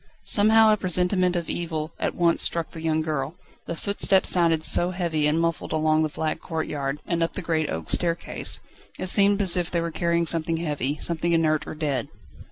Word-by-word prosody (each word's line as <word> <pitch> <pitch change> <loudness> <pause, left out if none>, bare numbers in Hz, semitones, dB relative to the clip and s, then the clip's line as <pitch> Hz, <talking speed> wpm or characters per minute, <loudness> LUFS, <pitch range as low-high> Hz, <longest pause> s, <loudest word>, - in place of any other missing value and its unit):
Somehow 220 +1 +5
a - - 0
presentiment 180 0 +1
of 170 -1 -2
evil 160 -2 -4
at - - -2
once 170 -1 +2
struck 170 -1 -2
the 160 - -9
young 160 -1 0
girl: 155 0 -3 0.3
the 170 - -4
footsteps 195 +1 +2
sounded 165 -3 +3
so 175 +2 +3
heavy 170 -5 -1
and 155 +2 +1
muffled 165 0 -2
along 155 0 +1
the 155 - 0
flagged 155 +1 -3
courtyard, 150 -4 -4
and 170 -1 -2
up 165 - -1
the 200 - -5
great 160 -2 -1
oak 80 0 -5
staircase. 170 -1 -1 0.4
It 185 - -2
seemed 200 +1 +4
as 185 -3 +4
if 175 -2 -1
they 170 - -1
were 170 0 -3
carrying 170 0 0
something 165 0 0
heavy, 150 -3 -3
something 170 0 -1
inert 155 -2 +1
or - - -6
dead. 145 -6 -2
165 Hz, 195 wpm, -24 LUFS, 155-175 Hz, 0.4 s, Somehow